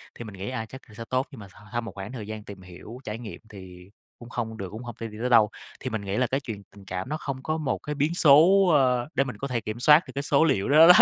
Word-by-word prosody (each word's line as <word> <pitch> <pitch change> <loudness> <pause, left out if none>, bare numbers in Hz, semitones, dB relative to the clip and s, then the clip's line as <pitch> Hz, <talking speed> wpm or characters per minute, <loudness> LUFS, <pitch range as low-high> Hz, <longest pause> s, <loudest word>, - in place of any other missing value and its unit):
thì - - -7
mình 105 - -9
nghĩ, 95 +4 -5
a, 115 -3 -3
chắc 130 +4 -11
là - - -15
sẽ 115 - -7
tốt 130 +1 0
nhưng 130 - -11
mà 100 - -10
s - - -21 0.2
sau 120 - 0
một 115 - -7
khoảng 95 +2 -7
thời 110 -5 -7
gian 110 -1 -6
tìm 100 -2 -10
hiểu, 90 +6 -11
trải 105 +1 -5
nghiệm 115 -3 -8
thì 95 -2 -12 0.3
cũng 120 - -11
không 115 -2 -4
được 95 -3 -5
cũng 110 +3 -7
hông 120 -2 -7
thể 115 - -4
đi 105 -1 -10
tới 125 - 0
đâu. 110 -4 +6 0.3
Thì 130 - -4
mình 110 -2 -3
nghĩ 100 0 -3
là 125 -1 +2
cái 135 - 0
chuyện 110 -7 -7
tình 100 -1 -14
cảm 95 +5 -5
nó 155 - -2
không 135 -3 -5
có 155 0 -1
một 150 -5 -1
cái 150 0 -5
biến 150 +4 +1
số, 175 +5 +6
ờ, 125 -3 +3
để 135 - +3
mình 130 -2 -7
có 140 - -4
thể 120 -3 -2
kiểm 110 +2 -5
soát 150 +6 +7
được 130 - -8
cái 140 - -2
số 140 +1 +3
liệu 135 -10 +1
đó 155 +3 +8
đó. 180 - +11
120 Hz, 315 wpm, -26 LUFS, 105-140 Hz, 0.3 s, đó